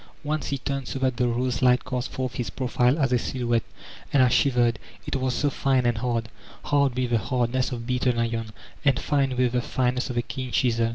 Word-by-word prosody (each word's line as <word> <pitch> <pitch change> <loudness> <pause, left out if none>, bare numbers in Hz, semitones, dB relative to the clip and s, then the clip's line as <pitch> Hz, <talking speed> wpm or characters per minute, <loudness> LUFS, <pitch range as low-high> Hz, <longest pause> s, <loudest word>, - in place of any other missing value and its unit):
Once 150 +1 -2
he 140 - -1
turned 135 -1 -3
so - - -4
that 130 -2 0
the 125 - +2
rose 120 0 -1
light 125 -1 +4
cast 125 -1 -3
forth 130 -1 -3
his 120 -3 -3
profile 125 +1 +1
as 135 -5 +1
a 125 - +3
silhouette; 120 -2 0 0.5
and 135 -2 +5
I 125 - +5
shivered, 120 -3 +2 0.3
it - - -2
was 130 -2 0
so 145 +2 +1
fine 130 -2 +1
and 120 -2 +1
hard! 115 -2 -1 0.4
Hard 140 -3 +2
with 125 -1 0
the 115 - +3
hardness 125 +3 0
of 120 -2 -5
beaten 125 -1 +1
iron, 115 -1 -1 0.4
and 140 -3 +3
fine 135 -3 0
with 125 -1 +2
the 125 0 +1
fineness 125 +1 -1
of 125 - -4
a 120 - +1
keen 130 +1 -5
chisel. 115 -3 +2
125 Hz, 220 wpm, -25 LUFS, 120-130 Hz, 0.5 s, and